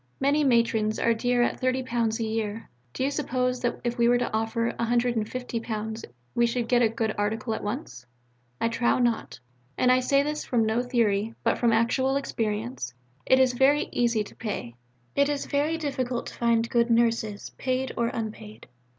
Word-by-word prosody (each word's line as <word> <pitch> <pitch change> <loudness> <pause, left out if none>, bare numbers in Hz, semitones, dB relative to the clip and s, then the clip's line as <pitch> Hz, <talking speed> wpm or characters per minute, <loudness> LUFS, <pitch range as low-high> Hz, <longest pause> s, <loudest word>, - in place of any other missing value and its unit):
Many 285 +2 +2
matrons 230 -4 +2
are 230 - +2
dear 245 +1 +1
at - - -1
£30 250 -3 0
a - - 0
year. 220 0 -3 0.2
Do 260 - -3
you 275 - +1
suppose 255 -3 -1
that 240 - -1
if 240 0 -2
we 235 - +4
were 245 - +5
to 245 - -2
offer 225 +1 0
£150 230 -2 -2 0.3
we 235 0 +3
should 235 0 -1
get 245 0 +3
a 230 - +4
good 220 -1 -1
article 220 +2 -1
at - - -4
once? 205 - -5 0.5
I - - +2
trow 230 +1 +1
not; 235 - 0 0.4
and 250 - +4
I 255 - +5
say 275 +2 +3
this 300 +1 -3
from 235 -3 +1
no 220 +2 +1
theory, 230 -3 0
but - - +1
from 235 -1 +3
actual 245 +4 +2
experience. 220 - -3 0.3
It 260 - +6
is 260 -1 +4
very 270 +4 +3
easy 235 -3 +1
to - - -14
pay. 205 - -5 0.4
It 280 0 +3
is 290 -1 -2
very 295 +3 0
difficult 260 -5 -2
to - - -8
find 235 -1 +1
good 235 0 +2
Nurses, 230 -3 +1
paid 260 0 -1
or 235 - +1
unpaid. 220 -2 -6
235 Hz, 180 wpm, -26 LUFS, 225-255 Hz, 0.5 s, It